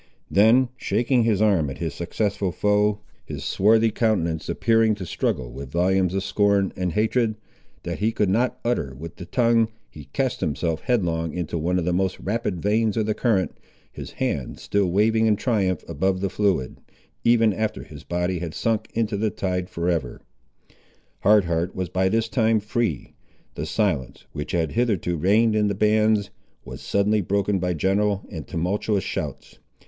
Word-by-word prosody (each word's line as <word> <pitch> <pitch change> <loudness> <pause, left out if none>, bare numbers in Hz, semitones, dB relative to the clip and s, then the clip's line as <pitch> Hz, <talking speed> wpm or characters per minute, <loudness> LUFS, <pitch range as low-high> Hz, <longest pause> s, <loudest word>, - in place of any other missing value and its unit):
Then 115 +5 +5
shaking 120 +3 +1
his 110 -2 +2
arm 95 -9 +2
at 65 - -7
his 80 -1 -3
successful 95 +2 -2
foe, 105 +2 +1 0.2
his - - -7
swarthy 110 +3 +3
countenance 90 -8 0
appearing 115 -1 +2
to 95 -3 -7
struggle 60 -6 -2
with 65 +2 -8
volumes 90 +2 +1
of 95 - -1
scorn 100 -1 +2
and 90 -2 -2
hatred, 110 +1 +1 0.5
that - - -4
he 110 +2 +1
could 105 -2 0
not 115 +7 +1
utter 70 - -1
with 80 +4 -9
the 90 - -9
tongue, 115 0 +3 0.2
he 75 -2 -11
cast 125 - -2
himself 80 0 -1
headlong 85 - 0
into 90 -2 -3
one 85 +3 0
of 85 - -1
the 90 - +1
most 95 +1 0
rapid 105 -3 -2
veins 110 +1 +1
of 110 - +1
the 110 - 0
current, 105 -5 0 0.4
his - - -9
hand 70 -4 -3
still 100 -2 0
waving 110 +4 +3
in 105 - +4
triumph 100 -4 -1
above 95 +4 0
the 95 -1 -2
fluid, 95 -10 0 0.5
even 115 -2 +4
after 110 +1 -2
his 75 0 -12
body 90 +1 -1
had 85 -2 -5
sunk 115 -2 -1
into 110 -2 0
the 110 +1 +1
tide 90 -2 -3
for 85 +1 -3
ever. 80 -9 -1 1.0
Hard 105 -1 +4
Heart 85 +2 -1
was 95 -2 -3
by 95 +2 +1
this 115 +2 +1
time 115 -2 +2
free. 105 - -2 0.4
The 75 - -5
silence, 80 - -1
which 75 +1 -6
had 80 -3 0
hitherto 105 -7 0
reigned 105 +7 +3
in 105 -1 +2
the 100 - -1
bands, 105 0 +2 0.3
was - - -9
suddenly 105 +1 +1
broken 100 +1 0
by 90 -1 -1
general 100 +4 +1
and 80 -8 -7
tumultuous 95 +3 -1
shouts. - - -5
100 Hz, 175 wpm, -24 LUFS, 85-110 Hz, 1.0 s, Then